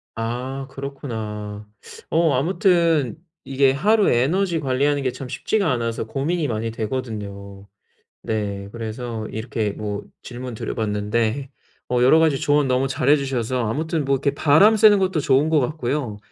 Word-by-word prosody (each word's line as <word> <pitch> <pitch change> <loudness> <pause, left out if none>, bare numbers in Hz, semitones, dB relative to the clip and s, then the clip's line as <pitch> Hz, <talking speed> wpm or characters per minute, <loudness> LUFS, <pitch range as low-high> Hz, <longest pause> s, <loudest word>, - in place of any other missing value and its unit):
아, 125 +4 -4
그렇구나. 110 -7 -6 0.4
어 165 -2 +3
아무튼 165 - +2 0.3
이게 135 0 +3
하루 210 +9 +3
에너지 165 +8 +1
관리하는 140 +1 +1
게 130 - 0
참 130 -1 -8
쉽지가 195 - 0
않아서 115 -2 -2
고민이 150 +6 -1
많이 115 -1 -2
되거든요. 105 -4 -5 0.6
네, 100 -2 -3
그래서 115 -1 -5
이렇게 110 -1 -2
뭐 105 0 -5 0.2
질문드려 125 -2 -6
봤는데 110 +5 -1 0.4
어 125 -1 +1
여러 135 +6 +6
가지 155 -4 +3
조언 145 -1 +2
너무 130 +1 +1
잘해 135 +2 +3
주셔서 130 -3 -2
아무튼 155 +3 -1
뭐 140 - +2
이렇게 140 +1 0
바람 180 +10 +5
쐬는 210 -2 +6
것도 185 -4 +1
좋은 140 +2 +2
것 155 -2 +4
같고요. 125 -4 -2
130 Hz, 315 characters per minute, -22 LUFS, 110-150 Hz, 0.6 s, 여러